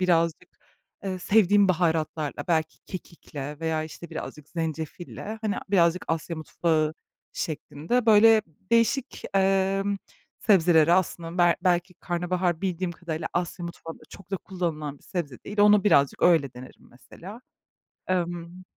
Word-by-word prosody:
birazcık, 170 -1 +1 0.6
eee, 190 -1 -3
sevdiğim 205 +1 +4
baharatlarla, 160 -4 0
belki 160 -2 0
kekikle 150 -5 -8
veya, 160 -1 0
işte, 160 +1 -10
birazcık 150 -1 -7
zencefille, 165 +6 -5
hani, 210 -2 0 0.2
birazcık 175 -2 +3
Asya 165 +1 -2
mutfağı 155 0 0 0.4
şeklinde, 165 +9 -2
böyle, 220 0 +7 0.3
değişik, 235 +3 +1
emm, 195 +1 +2 0.4
sebzeleri 170 -5 +4
aslında 175 -1 0
bel 175 -1 +5
belki 180 0 +1
karnabahar 175 -1 -1
bildiğim 185 -2 -2
kadarıyla 165 -1 -5
Asya 175 0 -2
mutfağında 165 -1 -8
çok 195 -1 -14
da 195 - 0
kullanılan 160 -7 -4
bir - - -28
sebze 150 -9 -4
değil. 205 0 -2
Onu 210 0 +6
birazcık 140 -9 +3
öyle 155 -7 +4
denerim 125 +1 -13
mesela. 190 - -12 0.7
Emm 175 0 -3
175 Hz, 125 wpm, -26 LUFS, 160-190 Hz, 0.7 s, böyle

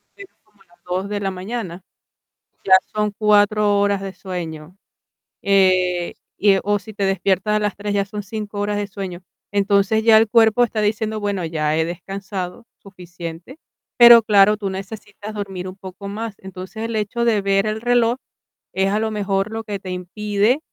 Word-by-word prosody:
que 400 - -10
es 390 - -16
como 210 -2 -32
a - - -23
las 175 - -26
2 185 +3 -3
de 205 - -2
la 195 -1 -2
mañana, 185 -1 -5 0.8
ya 190 - +3 0.2
son 210 -1 0
4 210 -1 +3
horas 200 -1 +1
de 195 -1 -6
sueño, 175 -3 -7 0.6
eh, 185 -3 +2 0.2
y, 200 -1 +4
o 205 +1 +1
si 220 +1 -12
te 200 - -3
despiertas 195 +2 +1
a - - +2
las 210 -2 -1
3, 205 0 -4
ya 200 -1 +1
son 205 +1 -6
5 210 0 -6
horas 205 0 -1
de 205 -1 -2
sueño. 190 -3 -7 0.3
Entonces, 200 +1 +2
ya 225 -1 +7
el 220 0 +3
cuerpo 225 +1 +5
está 220 -2 -1
diciendo: 215 +1 -1
"Bueno, 200 -3 -2
ya 155 -2 -1
he 160 - +2
descansado 190 +3 -6
suficiente". 175 - -10 0.4
Pero 235 -1 +10
claro, 210 -1 +5
tú 200 -2 -3
necesitas 205 +2 -8
dormir 195 -3 -5
un 185 - -8
poco 190 +1 -9
más. 215 +1 -5
Entonces, 190 +3 -8
el 230 0 -3
hecho 215 +3 -1
de 220 -3 +2
ver 195 +1 +1
el 215 +1 -2
reloj 240 0 +2 0.6
es 190 0 +1
a 210 - +1
lo 220 0 -1
mejor 200 -1 -1
lo 225 0 -4
que 205 -2 -5
te 190 - -9
impide, 205 - 0
200 Hz, 185 wpm, -20 LUFS, 190-215 Hz, 0.8 s, Pero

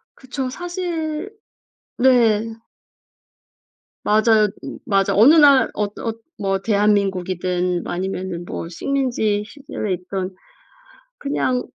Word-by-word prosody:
그쵸. 260 0 -5
사실 345 +1 -4 0.7
네. 230 -3 +3 1.5
맞아요. 215 0 +4 0.4
맞아. 195 -1 +2
어느 240 +10 +7
날 285 -4 +6
어떠 210 +2 -4
어 225 - -2 0.3
뭐 195 -1 0
대한민국이든 185 -4 0
아니면은 185 -1 -4
뭐 165 - -6
식민지 230 -1 -1
시절에 265 -8 -5
있든 185 +1 -5 0.8
그냥 255 -3 -1
215 Hz, 195 characters per minute, -21 LUFS, 190-265 Hz, 1.5 s, 어느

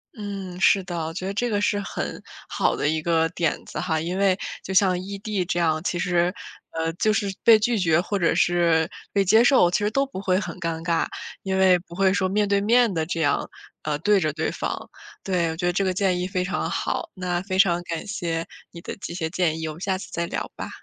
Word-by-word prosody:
嗯， 195 -4 -6
是 190 +1 +4
的， 170 -3 -4
我 160 - -5
觉 185 +2 -4
得 195 - -2
这 240 +4 -1
个 205 -2 0
是 205 0 +1
很 200 - -5 0.3
好 - - +1
的 - - -1
一 155 +1 0
个 165 0 +2
点 165 -2 -2
子 - - -6
哈， 160 -3 0
因 175 +3 -3
为 195 -1 +3 0.3
就 190 - -5
像 185 -2 +4
异 200 +2 -6
地 200 -3 -2
这 175 - -1
样， 160 -1 +1
其 175 - -1
实， 175 0 +1 0.4
呃， 165 0 -1
就 215 +5 +1
是 205 -2 0
被 225 -2 +7
拒 230 +2 +1
绝 170 -4 +3
或 200 +2 -2
者 170 -3 +2
是 170 -2 +2 0.2
被 200 - +3
接 220 +5 +5
受， 245 -9 +5
其 175 - +1
实 210 0 0
都 275 +4 +2
不 270 -8 -7
会 185 -1 +2
很 210 - -6
尴 165 -1 -3
尬， 165 0 +1 0.4
因 190 -1 -1
为 185 -1 +6
不 170 0 -15
会 190 0 +3
说 190 -2 +1
面 205 +2 +1
对 200 0 +2
面 235 +1 +4
地 160 -1 0
这 165 0 -3
样， 145 -2 +1 0.4
啊， 150 -1 -1
对 205 +4 +3
着 155 -4 0
对 160 +1 -1
方， - - -4 0.3
对， 180 -4 0
我 - - -5
觉 175 - -2
得 175 - +1
这 195 - +1
个 185 -1 +1
建 185 -1 +1
议 180 - -1
非 185 -1 -1
常 195 +2 -2
好。 335 - -2
那 180 -2 -2
非 190 0 -3
常 175 -3 +4
感 170 +2 -5
谢 170 -6 -3 0.2
你 170 - -10
的 - - -6
这 170 - -6
些 165 -2 -2
建 165 -2 0
议， 160 - -3
我 155 - -4
们 160 - -13
下 190 -1 0
次 185 - -8
再 170 - -2
聊 - - -4
吧。 - - -6
180 Hz, 265 characters per minute, -24 LUFS, 170-200 Hz, 0.4 s, 被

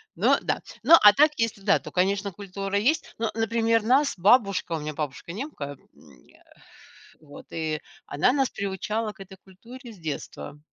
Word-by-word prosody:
Но, - - +3
да. - - -2 0.2
Но 335 - +8
опять-таки, 280 +4 +5
если, 220 -3 -4
да, 195 0 +3
то, - - -11
конечно, 195 +2 0
культура 195 +1 -4
есть, 260 +11 0
но, 225 -1 -2
например, 225 0 +1
нас 270 +5 +3
бабушка- 200 -3 +3
у 160 - -3
меня 150 0 -5
бабушка 150 +2 -6
немка, 175 - -6 0.2
м, 65 -5 -20
э, - - -23 0.8
вот- 145 -2 -14
и 155 -2 -3 0.2
она 150 +12 +1
нас 270 -2 +1
приучала 210 +3 -3
к - - -27
этой 190 0 -12
культуре 235 +7 -13
с - - -16
детства. 150 -2 -7
200 Hz, 170 wpm, -25 LUFS, 170-230 Hz, 0.8 s, Но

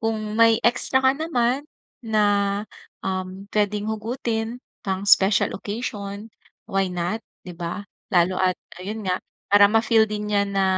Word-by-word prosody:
kung 225 0 0 0.2
may 230 -1 +6
extra 245 +2 +2
ka 260 - +6
naman 270 -4 0 0.4
na, 205 -2 +2 0.4
um, 185 0 -3
puwedeng 210 0 +1
hugutin 225 +1 -2 0.3
pang 190 0 -2
special 195 0 +4
occasion, 205 -1 -5 0.4
why 195 -3 0
not, 180 +4 -2 0.2
'di 180 - -7
ba? 170 +4 -5 0.2
Lalo 185 -1 +2
at 185 -1 +2 0.2
ayun 210 +3 -5
nga 185 0 0 0.3
para 205 0 +8
ma-feel 225 0 +4
din 210 0 -4
niya 200 0 +3
na, 195 -1 +1
205 Hz, 140 wpm, -23 LUFS, 195-225 Hz, 0.4 s, para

